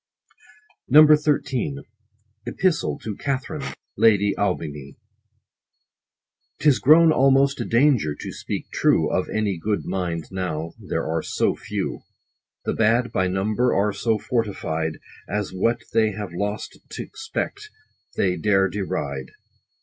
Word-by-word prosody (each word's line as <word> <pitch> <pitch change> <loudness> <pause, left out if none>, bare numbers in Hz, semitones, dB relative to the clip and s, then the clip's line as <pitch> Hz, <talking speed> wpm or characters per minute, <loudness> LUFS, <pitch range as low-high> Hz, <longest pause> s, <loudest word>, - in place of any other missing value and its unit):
90 150 +3 +8
XIII. 145 -2 -1 0.4
— 105 0 -43
EPISTLE 185 -3 0
TO 110 -2 -6
KATHARINE 140 +1 -3 0.3
LADY 105 -2 +4
AUBIGNY. 75 -8 -3 1.6
'Tis 145 -4 +3
grown 160 +4 +6
almost 135 -1 +3
a - - -2
danger 115 - +2
to - - -7
speak - - -6
true 80 -2 +2
Of 95 - -1
any 105 -5 -1
good 105 +4 -2
mind, 90 -3 -2
now; 85 -4 -3
there - - -3
are 80 +1 -1
so - - 0
few. - - -4 0.7
The - - 0
bad, 115 +2 +2
by 95 -4 +1
number, 105 +6 +1
are 100 +1 +1
so 110 +2 0
fortified, 90 -9 -2 0.3
As 105 0 -2
what 115 +6 0
they 110 -2 +3
have 100 -3 -6
lost 105 +4 -4
t' - - -5
expect, 425 -1 -5 0.5
they 90 -2 +1
dare 95 +2 +3
deride. 70 -9 -3
105 Hz, 125 wpm, -23 LUFS, 90-130 Hz, 1.6 s, 90